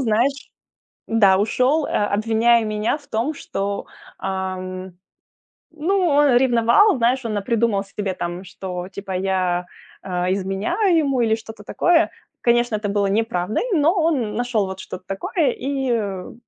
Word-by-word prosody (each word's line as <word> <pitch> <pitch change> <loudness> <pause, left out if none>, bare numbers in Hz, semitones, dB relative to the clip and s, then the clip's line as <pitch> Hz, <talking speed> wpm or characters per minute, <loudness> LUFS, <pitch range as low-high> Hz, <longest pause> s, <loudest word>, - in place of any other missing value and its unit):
знаешь 255 +4 0 0.6
да, 200 -4 +5
ушел, 255 +9 +2
э, - - -6
обвиняя 225 +3 +2
меня 215 +4 -1
в 290 - -17
том, 240 +8 -1
что, 200 -6 -4 0.3
ам. 185 -1 -4 0.8
Ну, 335 +6 0
он 285 -3 +4
ревновал, 245 - +4
знаешь, 250 +2 +1
он 220 -2 -2
напридумал 210 -1 0
себе 195 -1 -4
там, 175 +1 -4
что 180 -1 -6
типа 195 0 -7
я, 185 -1 0 0.4
э, 180 -1 -1
изменяю 200 - 0
ему 275 -5 +1
или 220 -2 +2
что-то 220 -1 -11
такое. 335 - +2 0.3
Конечно, 240 -1 +2
это 210 0 -3
было 200 0 +1
неправдой, 205 -2 0
но 320 -2 +4
он 300 - 0
нашёл 235 -3 0
вот 190 0 -7
что-то 185 0 -8
такое, 195 - 0
и, 275 - -2
э, 200 -5 -2
ну - - -11
220 Hz, 145 wpm, -21 LUFS, 195-260 Hz, 0.8 s, да